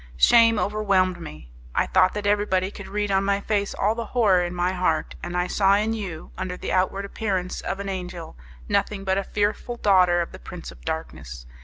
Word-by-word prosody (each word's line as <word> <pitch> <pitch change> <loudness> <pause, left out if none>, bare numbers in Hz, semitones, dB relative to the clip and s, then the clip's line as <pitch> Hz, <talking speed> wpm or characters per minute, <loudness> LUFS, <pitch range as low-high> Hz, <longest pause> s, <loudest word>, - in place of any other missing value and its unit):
Shame 230 - +6
overwhelmed 200 -4 +1
me! 75 - -10 0.2
I - - +3
thought 185 +1 +3
that 210 -1 -3
everybody 205 -2 +1
could - - -9
read 205 0 -2
on 195 0 +2
my 200 0 +1
face 200 -1 -1
all 210 +2 +1
the 230 0 -4
horror 195 -6 +5
in 175 0 -4
my 175 +1 +1
heart, 180 -4 0
and 175 0 -4
I 180 - +1
saw 195 +1 +3
in 215 +2 +1
you, 190 -7 -6
under 185 -1 -3
the - - -4
outward 190 +2 0
appearance 190 -3 -3
of 195 - -4
an 200 - -5
angel, 180 -3 -6 0.3
nothing 195 - 0
but 190 0 +1
a - - -2
fearful 210 +4 -1
daughter 185 -5 +4
of - - -10
the - - -11
Prince - - -9
of - - -16
Darkness. 65 -2 -5
195 Hz, 205 wpm, -24 LUFS, 180-205 Hz, 0.3 s, Shame